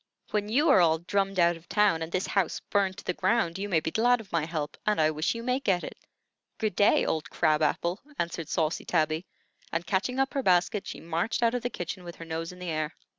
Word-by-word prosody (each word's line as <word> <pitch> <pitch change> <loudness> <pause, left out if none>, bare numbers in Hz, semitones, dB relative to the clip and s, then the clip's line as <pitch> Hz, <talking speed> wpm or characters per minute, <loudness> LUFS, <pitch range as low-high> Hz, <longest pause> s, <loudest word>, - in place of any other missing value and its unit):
"When 210 -1 -1
you 285 +8 +3
are 190 - +6
all 160 -2 +4
drummed 195 +3 -1
out 170 -1 +4
of 165 +1 -16
town 205 -6 +3
and 160 +1 -4
this 185 +2 0
house 195 -4 0
burnt 195 -2 +1
to - - -9
the 180 - -1
ground, 190 -4 +1
you 205 +1 -3
may 170 -4 +3
be 160 - -3
glad 245 +4 +3
of 220 - -12
my 165 -2 0
help, 155 -3 -3
and 210 -3 +1
I 155 0 +4
wish 155 +7 -1
you 230 - -5
may 250 +2 +1
get 190 -9 +1
it. - - -6 0.6
Good 215 -1 -1
day, 205 - +4
old 160 -1 -2
crab 155 -2 +2
apple," 170 +5 0 0.2
answered 170 -2 -3
saucy 160 -1 0
Tabby; 160 +1 0 0.4
and 165 +1 -2
catching 205 +8 -1
up 270 0 +1
her 275 - 0
basket, 190 0 +2
she - - -6
marched 170 +9 -1
out 230 0 +3
of 245 - -1
the 245 - -2
kitchen 180 -3 -5
with 175 -1 -8
her 165 - -9
nose 165 +1 -4
in 180 - -12
the 180 -2 -4
air. 155 0 -2
180 Hz, 245 wpm, -28 LUFS, 165-210 Hz, 0.6 s, are